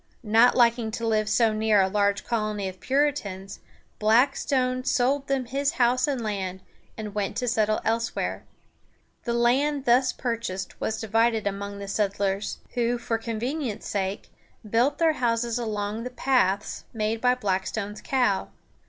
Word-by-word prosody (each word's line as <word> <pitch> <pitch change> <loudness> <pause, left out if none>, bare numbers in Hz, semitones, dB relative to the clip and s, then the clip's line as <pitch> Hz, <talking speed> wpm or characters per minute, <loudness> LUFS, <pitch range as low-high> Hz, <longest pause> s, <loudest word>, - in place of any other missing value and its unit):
Not 225 +3 +5
liking 235 -2 +3
to 230 - -3
live 215 -1 +1
so 225 -1 +3
near 215 -1 +3
a 190 - +4
large 200 0 +1
colony 215 -3 -1
of 185 0 -8
Puritans, 260 -9 -1 0.4
Blackstone 255 +3 +2
sold 270 +3 +1
them 270 -2 0
his 275 +5 -1
house 255 -2 +2
and 275 -3 -1
land, 190 -4 -3 0.4
and 215 -2 -6
went 205 -1 -2
to 250 - -1
settle 215 -2 +2
elsewhere. 230 +1 -1 0.8
The 235 - 0
land 270 +4 +2
thus 250 +2 +4
purchased 230 -6 -4
was 220 - -1
divided 225 0 +1
among 200 0 -3
the 200 0 -7
settlers, 200 0 -1 0.2
who, 240 0 +1
for 230 -1 -2
convenience' 235 +2 -3
sake, 195 -1 -3 0.4
built 240 +7 +2
their 325 -1 +3
houses 235 -2 0
along 210 -1 -3
the 250 - -4
paths 245 -6 0
made 220 0 -1
by 250 0 +4
Blackstone's 205 -1 -2
cow. 245 -8 +1
230 Hz, 145 wpm, -26 LUFS, 205-250 Hz, 0.8 s, Not